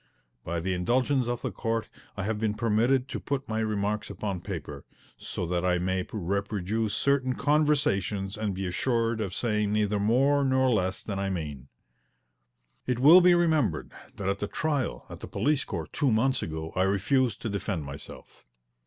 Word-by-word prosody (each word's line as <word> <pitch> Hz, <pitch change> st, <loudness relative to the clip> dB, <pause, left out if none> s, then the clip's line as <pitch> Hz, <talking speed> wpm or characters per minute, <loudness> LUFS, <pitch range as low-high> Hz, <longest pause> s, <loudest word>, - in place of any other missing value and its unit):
By 85 Hz, +1 st, -2 dB
the 95 Hz, +3 st, -1 dB
indulgence 125 Hz, +8 st, +1 dB
of 120 Hz, -1 st, -3 dB
the -, -, -2 dB
Court 115 Hz, 0 st, -2 dB, 0.3 s
I 95 Hz, -, -2 dB
have 105 Hz, +1 st, -1 dB
been 110 Hz, -1 st, 0 dB
permitted 120 Hz, +4 st, +2 dB
to -, -, -3 dB
put 140 Hz, -2 st, -3 dB
my 110 Hz, 0 st, -2 dB
remarks 105 Hz, -1 st, -1 dB
upon 100 Hz, -2 st, -4 dB
paper, 75 Hz, -7 st, -6 dB, 0.3 s
so -, -, -5 dB
that 90 Hz, +1 st, -1 dB
I 90 Hz, -1 st, +2 dB
may 95 Hz, +1 st, -1 dB
reproduce 100 Hz, +2 st, -1 dB
certain 135 Hz, -2 st, +2 dB
conversations 110 Hz, -, +1 dB
and 105 Hz, -3 st, -2 dB
be 95 Hz, +1 st, -3 dB
assured 115 Hz, +4 st, 0 dB
of 100 Hz, -4 st, -2 dB
saying 105 Hz, -3 st, 0 dB
neither 105 Hz, -1 st, +1 dB
more 135 Hz, +7 st, +3 dB
nor 130 Hz, -1 st, +3 dB
less 95 Hz, -4 st, 0 dB
than 100 Hz, -2 st, -4 dB
I 100 Hz, 0 st, -1 dB
mean. 75 Hz, -7 st, -5 dB, 1.2 s
It 125 Hz, -2 st, +1 dB
will 155 Hz, +9 st, +8 dB
be 180 Hz, 0 st, +6 dB
remembered 155 Hz, -, +1 dB, 0.2 s
that 100 Hz, -, -4 dB
at 100 Hz, 0 st, 0 dB
the 105 Hz, -, -2 dB
trial 140 Hz, -, -2 dB
at -, -, -9 dB
the -, -, -7 dB
police 145 Hz, -1 st, +1 dB
court 85 Hz, -5 st, -6 dB
two 140 Hz, -, +2 dB
months 130 Hz, +5 st, +2 dB
ago 80 Hz, 0 st, -5 dB
I 95 Hz, -, +1 dB
refused 100 Hz, +5 st, +2 dB
to 115 Hz, -, -1 dB
defend 95 Hz, -4 st, -2 dB
myself. 70 Hz, -3 st, -11 dB
105 Hz, 175 wpm, -28 LUFS, 95-130 Hz, 1.2 s, will